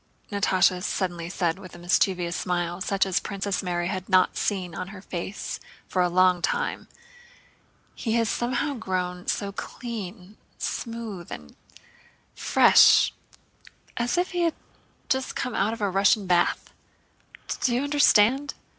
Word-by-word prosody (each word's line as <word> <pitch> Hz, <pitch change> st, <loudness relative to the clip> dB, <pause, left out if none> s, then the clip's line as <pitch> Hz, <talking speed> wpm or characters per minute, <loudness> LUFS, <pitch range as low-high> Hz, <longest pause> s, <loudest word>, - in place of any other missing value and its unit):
Natásha 190 Hz, -2 st, +2 dB
suddenly 175 Hz, -3 st, -2 dB
said 175 Hz, -1 st, -1 dB
with 185 Hz, -3 st, -11 dB
a -, -, -10 dB
mischievous 175 Hz, 0 st, +1 dB
smile 175 Hz, 0 st, -2 dB
such 195 Hz, 0 st, +1 dB
as 190 Hz, -2 st, +1 dB
Princess 200 Hz, -1 st, -3 dB
Mary 175 Hz, -2 st, -2 dB
had 185 Hz, 0 st, -4 dB
not 185 Hz, -1 st, +4 dB
seen 185 Hz, -4 st, -2 dB
on 180 Hz, -, -5 dB
her 195 Hz, 0 st, -10 dB
face 185 Hz, +3 st, -5 dB, 0.3 s
for 185 Hz, -, 0 dB
a 180 Hz, -, +2 dB
long 185 Hz, 0 st, +4 dB
time, 485 Hz, 0 st, -1 dB, 1.1 s
"he 225 Hz, -, -3 dB
has 230 Hz, -1 st, +2 dB
somehow 240 Hz, +6 st, -1 dB
grown 185 Hz, -6 st, -3 dB
so 200 Hz, -1 st, -1 dB
clean, 210 Hz, -3 st, -7 dB, 0.2 s
smooth, 230 Hz, -7 st, -5 dB
and 75 Hz, -1 st, -9 dB, 0.8 s
fresh—as -, -, +6 dB, 1.1 s
if 355 Hz, +1 st, 0 dB
he 355 Hz, -1 st, -1 dB
had 335 Hz, -2 st, +1 dB, 0.5 s
just 265 Hz, 0 st, -1 dB
come 250 Hz, -, -3 dB
out 205 Hz, +3 st, +1 dB
of 225 Hz, -1 st, -6 dB
a 205 Hz, -, +1 dB
Russian 195 Hz, +2 st, +3 dB
bath; 175 Hz, -1 st, +1 dB, 0.9 s
do 240 Hz, -, +1 dB
you 255 Hz, -, 0 dB
understand? 285 Hz, -2 st, +4 dB
195 Hz, 135 wpm, -25 LUFS, 180-230 Hz, 1.1 s, fresh—as